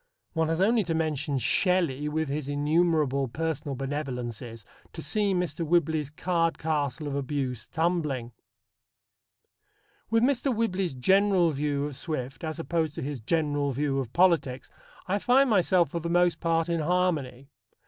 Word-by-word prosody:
One 160 -1 +1
has 165 +1 -1
only 220 +3 +3
to 165 -1 -1
mention 150 -3 -1
Shelley 150 - +1
with 160 +1 -1
his 140 0 -3
innumerable 145 -2 +1
personal 150 +1 -3
benevolences 125 -5 -5 0.3
to - - -8
set 215 - 0
Mr. 180 -5 0
Whibley's 160 -3 +1
card 165 +2 0
castle 150 -2 -2
of 145 - -3
abuse 135 -3 -3
tumbling. 155 -8 -1 1.8
With 225 +1 +3
Mr. 270 +1 +2
Whibley's 195 - -1
general 190 +4 +3
view 145 0 -1
of 145 -2 -5
Swift 135 -3 -4
as 160 0 -3
opposed 165 -2 -1
to - - -4
his 140 -1 -4
general 145 +1 0
view 140 +1 0
of 125 -4 -4
politics, 160 -8 +2 0.3
I 195 +2 0
find 255 +3 +4
myself 180 -5 +3
for 170 - -2
the 170 +1 -4
most 175 0 +2
part 165 0 +1
in 170 -1 0
harmony. 150 -6 -1
155 Hz, 150 wpm, -27 LUFS, 140-175 Hz, 1.8 s, find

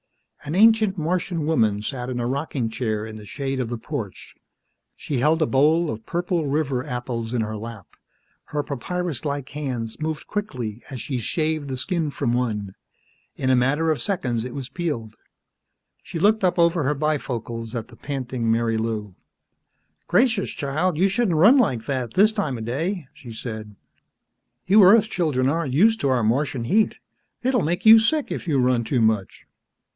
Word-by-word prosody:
An 150 - -4
ancient 215 -1 +5
Martian 170 0 -1
woman 110 -9 +1
sat 125 +1 -4
in 125 -1 -3
a 120 - -1
rocking 135 -1 -2
chair 110 -3 -2
in 110 -1 -8
the 105 -1 -11
shade 135 +1 -3
of 125 -3 -2
the 120 - -3
porch. 115 - -6 0.6
She 140 -4 -3
held 155 +5 +3
a 155 - +3
bowl 155 +5 +3
of 110 0 -8
purple 175 -2 -1
river 140 -3 0
apples 120 -2 -4
in 125 -2 0
her 110 0 -3
lap. 110 -2 -8 0.6
Her 150 -1 -3
papyrus 155 +1 -3
like 140 -2 -3
hands 125 -7 -4
moved 155 0 -3
quickly 125 - -4
as 130 -3 -6
she 130 0 -3
shaved 155 +4 -1
the 130 -1 -4
skin 165 +2 -1
from 120 -4 -1
one. 105 -6 -2 0.6
In 130 -1 0
a - - +5
matter 145 +6 +2
of 155 - -1
seconds 125 - -1
it 125 0 -7
was 135 -3 -5
peeled. 135 -11 -4 0.9
She 175 - -7
looked 210 +5 +3
up 180 -1 +2
over 170 -1 +3
her 150 +2 +1
bifocals 120 -6 -3
at 115 -2 -4
the - - -14
panting 130 -4 -3
Marilou. 115 -3 -1 0.9
"Gracious, 240 -5 +2
child, 150 +5 -1
you 190 +4 +4
shouldn't 195 -4 +1
run 220 - +7
like 125 - +1
that 130 -4 -3
this 210 +3 +5
time 175 - -2
of 110 - -6
day," 165 - -2
she 140 -5 -11
said. 110 -2 -7 0.9
"You 200 +2 +6
Earth 215 +3 +7
children 155 -11 0
aren't 145 -2 -1
used 225 +7 +4
to 140 - +1
our 125 -3 +2
Martian 125 +2 0
heat. 210 - +2 0.5
It'll 255 -2 +2
make 175 +5 -1
you 220 +1 +10
sick 290 +7 +1
if - - -4
you 150 -4 +2
run 125 -2 +2
too 120 +2 0
much." 110 -3 0
140 Hz, 175 wpm, -23 LUFS, 120-170 Hz, 0.9 s, you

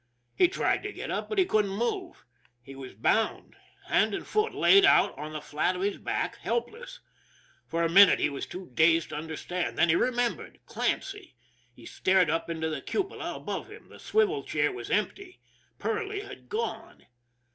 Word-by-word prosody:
He 360 - +5
tried 370 - 0
to 415 - -5
get - - -6
up, - - -3
but 430 - -3
he 375 - +5
couldn't 210 - +1
move. 345 - -3 0.3
He 135 +3 -13
was 135 -5 -10
bound 220 - 0 0.3
hand - - +2
and - - -6
foot, 430 +1 0
laid 395 0 +5
out 390 - +5
on 150 +1 -7
the 155 - -5
flat 150 +5 -1
of 180 - -3
his 200 0 -1
back - - -2
helpless. 485 +2 -4 0.7
For 165 +1 -1
a - - +3
minute 195 +4 +7
he - - +1
was 140 -1 -5
too 180 -6 -9
dazed 165 +3 +3
to - - -5
under 160 0 -6
stand, 180 -1 -3
then 170 - +4
he 160 - +4
remembered 245 +3 -1
Clancy. 390 - -3 0.4
He 120 -1 -16
stared 185 -4 +2
up 165 +1 -2
into 160 -1 -2
the 155 - -4
cupola 395 0 -3
above - - -5
him. - - -14
The - - -14
swivel 425 -1 +1
chair - - 0
was 395 +1 -7
empty 395 -3 -2 0.4
Perley 425 -2 -3
had 405 0 -12
gone! 450 +1 -5
210 Hz, 185 wpm, -28 LUFS, -, 0.7 s, minute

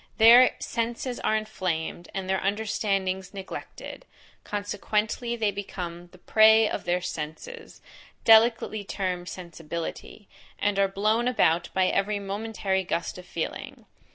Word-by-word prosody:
Their 235 +3 +8
senses 235 +2 -3
are 220 - +1
inflamed, 175 -5 -3
and 190 -1 -3
their 190 0 +1
understandings 195 -2 -1
neglected; 195 -1 -8 0.4
consequently 210 +3 -2
they 220 -3 0
become 175 -3 -6
the 185 - -18
prey 220 +3 +5
of - - -4
their 175 +1 +1
senses, 180 - -7 0.4
delicately 225 -1 +5
termed 185 -3 -3
sensibility, 170 +3 -7 0.3
and 205 -1 0
are 195 - +4
blown 215 +5 +1
about 175 -8 +2
by 190 -1 +3
every 200 +2 +1
momentary 200 -1 -2
gust 175 0 -3
of 180 - -13
feeling. 165 - -5
200 Hz, 125 wpm, -26 LUFS, 180-220 Hz, 0.4 s, Their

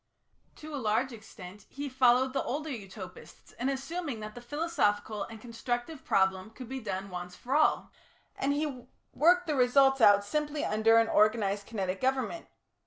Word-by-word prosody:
To 310 0 -10
a 285 - -3
large 225 +4 +1
extent 205 -3 -12
he 285 +1 -5
followed 260 0 +3
the 270 - 0
older 300 +3 -3
Utopists 195 -5 -10
in 255 +3 0
assuming 275 -1 -4
that 215 0 -7
the 245 - -10
philosophical 240 -8 -1
and 225 -1 -10
constructive 240 +5 -4
problem 190 +1 +1
could 245 +2 -10
be 265 +2 -5
done 195 -4 -5
once 180 0 -6
for 260 +3 -3
all, 310 - +2 0.4
and 275 - 0
he 285 -4 -3 0.3
worked 355 +5 +4
the 310 - -1
results 270 0 +4
out 200 -1 +6
simply 300 +5 -2
under 220 +2 +4
an 230 0 +4
organised 210 -2 +2
kinetic 190 -4 -3
government. 265 +5 -1
245 Hz, 165 wpm, -30 LUFS, 210-275 Hz, 0.4 s, out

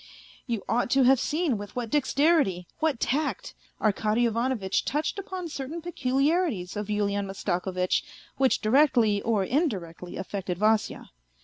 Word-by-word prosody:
You 230 -5 -2
ought 245 +1 +1
to 270 - +6
have 260 0 +5
seen 300 - 0
with 205 0 -9
what 240 -3 -3
dexterity, 285 - +2
what 310 -6 0
tact, 290 +3 -1 0.3
Arkady 215 +2 +1
Ivano 235 +3 0
vitch 190 -2 -1
touched 305 +7 -2
upon 375 -3 -5
certain 300 +1 -5
peculiarities 280 - 0
of 205 -1 -3
Yulian 205 -1 0
Mastakovitch 185 -1 -1 0.4
which 265 -1 +2
directly 225 -4 +3
or 220 -4 +1
indirectly 190 - -2
affected 190 -2 -4
Vasya. 215 +2 0
235 Hz, 135 wpm, -27 LUFS, 200-290 Hz, 0.4 s, to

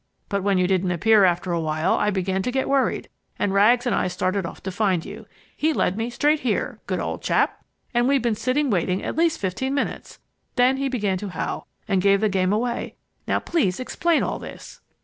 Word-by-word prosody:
But 200 -1 -1
when 195 0 +2
you 180 - +3
didn't 185 0 +1
appear 205 +4 +4
after 175 0 +1
a 170 - 0
while, 155 +2 0
I 210 - +1
began 190 -1 -1
to 250 - -2
get 265 +1 0
worried, 275 -1 +1 0.3
and 195 - 0
Rags 235 +5 +4
and 245 - +1
I - - +1
started 185 +1 -1
off - - -11
to 190 - -3
find 185 -4 0
you. - - -9 0.3
He 315 +1 +1
led 185 - +1
me 225 +2 -2
straight 295 +5 +2
here 235 -7 -1
(good - - -1
old - - -3
chap!) - - 0 0.3
and 240 +1 +2
we've 275 0 +3
been 235 -2 +2
sitting 255 +5 0
waiting 185 0 0
at - - -3
least 330 0 +2
fifteen 260 +9 -2
minutes. 285 - -3 0.4
Then 250 +2 +4
he 275 0 -1
began 205 -7 -1
to 205 0 -5
howl 180 - -4 0.2
and 195 -3 +2
gave 200 +1 +4
the 215 0 +2
game 190 -1 +1
away. 235 +3 -2 0.3
Now - - +2
please 260 - 0
explain 325 +6 +1
all - - -2
this!" - - -10
205 Hz, 215 wpm, -23 LUFS, 185-255 Hz, 0.4 s, appear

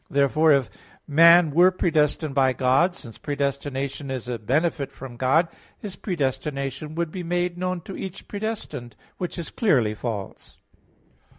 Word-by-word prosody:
Therefore 145 +3 +3
if 140 -3 +2 0.4
man 165 +2 +7
were 175 +5 +6
predestined 155 -4 +1
by 130 -1 +3
God, 135 +9 +2
since 115 - -10
predestination 140 -1 -3
is 130 -3 -4
a 120 -2 -3
benefit 140 +4 0
from 135 -2 -10
God, 135 +7 +3 0.3
his 205 -4 -7
predestination 140 - -3
would 170 -1 -2
be 185 - -5
made 175 0 -1
known 180 0 -2
to 190 - -8
each 190 -1 -7
predestined; 200 - -5 0.2
which 180 0 -4
is 170 -3 -5
clearly 130 - +2
false. 105 -3 -6
145 Hz, 140 wpm, -24 LUFS, 135-175 Hz, 0.4 s, man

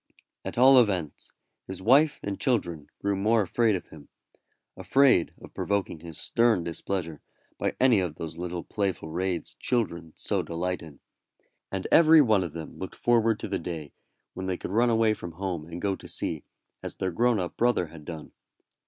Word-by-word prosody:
At - - -6
all 130 +1 +8
events, 90 -9 -2 0.4
his 95 -1 -6
wife 140 +9 +4
and 100 -1 -4
children 85 - -1 0.2
grew 100 0 +1
more 110 +3 +2
afraid 110 +3 +2
of 90 - -6
him 75 -2 -14 0.7
afraid 95 +1 +3
of - - -13
provoking 100 -5 -2
his 80 -1 -10
stern 115 -6 +2
displeasure 85 -1 -4 0.4
by - - -1
any 125 -5 +5
of 90 -5 -2
those 80 0 -6
little 90 0 -4
playful 95 -6 -2
raids 90 0 -2
children 85 -10 -2
so - - -1
delight 90 +2 -3
in; 75 -4 -13 0.7
and 95 -1 -3
every 160 -1 +7
one 110 -9 +4
of 85 -4 -6
them 80 -2 -7
looked 95 - -7
forward 115 -2 +2
to - - -3
the - - -2
day 80 -4 -6 0.4
when 95 - -5
they 95 -1 -1
could - - -6
run 120 +4 +3
away 110 -1 +3
from 85 -5 -8
home 90 -3 -4
and 85 +1 -8
go 100 -1 +1
to - - -12
sea, 80 -3 -3 0.4
as - - -5
their 95 - -2
grown 120 +4 +2
up 90 -2 -4
brother 120 -6 +2
had 80 -1 -12
done. 80 0 -8
95 Hz, 180 wpm, -27 LUFS, 85-115 Hz, 0.7 s, all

